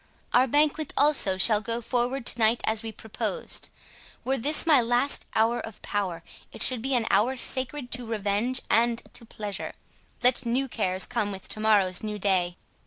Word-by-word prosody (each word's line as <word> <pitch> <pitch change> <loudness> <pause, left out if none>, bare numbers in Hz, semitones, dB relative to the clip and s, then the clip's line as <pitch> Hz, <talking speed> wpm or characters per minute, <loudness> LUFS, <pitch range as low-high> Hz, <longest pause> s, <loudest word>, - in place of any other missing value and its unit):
Our 255 +2 +4
banquet 295 +2 +1
also 280 -10 +2
shall 210 +2 +4
go 230 +1 -2
forward 245 +2 -2
to 240 - +4
night 225 +1 +3
as 220 0 0
we 225 -1 -6
proposed. 220 - -4 0.6
Were 265 - +1
this 295 +6 +2
my 300 -6 +5
last 245 +4 +2
hour 230 +2 +2
of 220 -2 -9
power, 195 -5 -3 0.3
it - - -2
should 255 -3 +1
be 265 +2 -1
an 235 -2 +1
hour 240 +7 +2
sacred 260 +1 -1
to 245 -1 -3
revenge 220 +3 -1
and 235 +1 +1
to 230 - -8
pleasure—let 220 +4 -3
new 250 +3 0
cares 190 -6 -1
come 205 -1 -2
with 195 -1 -9
to - - +1
morrow's 200 -4 +2
new 210 -1 -5
day." 185 -3 0
230 Hz, 175 wpm, -26 LUFS, 210-255 Hz, 0.6 s, my